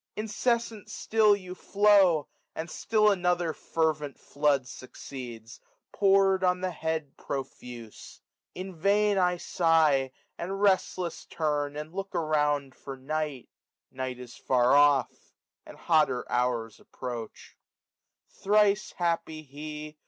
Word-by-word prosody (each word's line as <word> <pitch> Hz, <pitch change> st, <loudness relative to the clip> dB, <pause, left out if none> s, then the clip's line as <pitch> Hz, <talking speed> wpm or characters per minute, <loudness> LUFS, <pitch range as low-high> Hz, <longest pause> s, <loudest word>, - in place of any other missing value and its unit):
Incessant 220 Hz, 0 st, -1 dB
sdll 215 Hz, -2 st, +2 dB
you 185 Hz, -1 st, -8 dB
flow. 195 Hz, -5 st, +3 dB, 0.3 s
And 160 Hz, +2 st, -5 dB
still 215 Hz, -1 st, +2 dB
another 180 Hz, -3 st, 0 dB
fervent 155 Hz, -4 st, -2 dB
flood 140 Hz, -3 st, 0 dB
succeeds, 120 Hz, -4 st, -9 dB, 0.3 s
Pour'd 195 Hz, -1 st, +3 dB
on 180 Hz, 0 st, +2 dB
the 185 Hz, 0 st, -1 dB
head 160 Hz, -3 st, -3 dB
profuse. 125 Hz, -4 st, -8 dB, 0.4 s
In 185 Hz, +1 st, -6 dB
vain 200 Hz, +4 st, +2 dB
I 180 Hz, -1 st, +2 dB
sigh, 160 Hz, -7 st, +2 dB, 0.3 s
455 170 Hz, -, -4 dB
And 195 Hz, 0 st, -4 dB
restless 185 Hz, -3 st, +1 dB
turn, 145 Hz, -2 st, -2 dB
and 150 Hz, +2 st, -7 dB
look 195 Hz, +1 st, -5 dB
around 150 Hz, -4 st, 0 dB
for 135 Hz, 0 st, -9 dB
Night; 150 Hz, -1 st, -4 dB, 0.4 s
Night 130 Hz, -1 st, -4 dB
is 125 Hz, -1 st, -10 dB
far 125 Hz, 0 st, +2 dB
off} 145 Hz, -1 st, +2 dB, 0.3 s
and -, -, -12 dB
hotter 155 Hz, -7 st, +2 dB
hours 120 Hz, -2 st, -1 dB
approach* 120 Hz, -3 st, -8 dB, 0.7 s
SUMME -, -, -28 dB
JL -, -, -23 dB
Thrice 205 Hz, 0 st, +3 dB
happy 165 Hz, -2 st, -2 dB
he 150 Hz, +1 st, -8 dB
155 Hz, 125 wpm, -28 LUFS, 135-190 Hz, 0.7 s, flow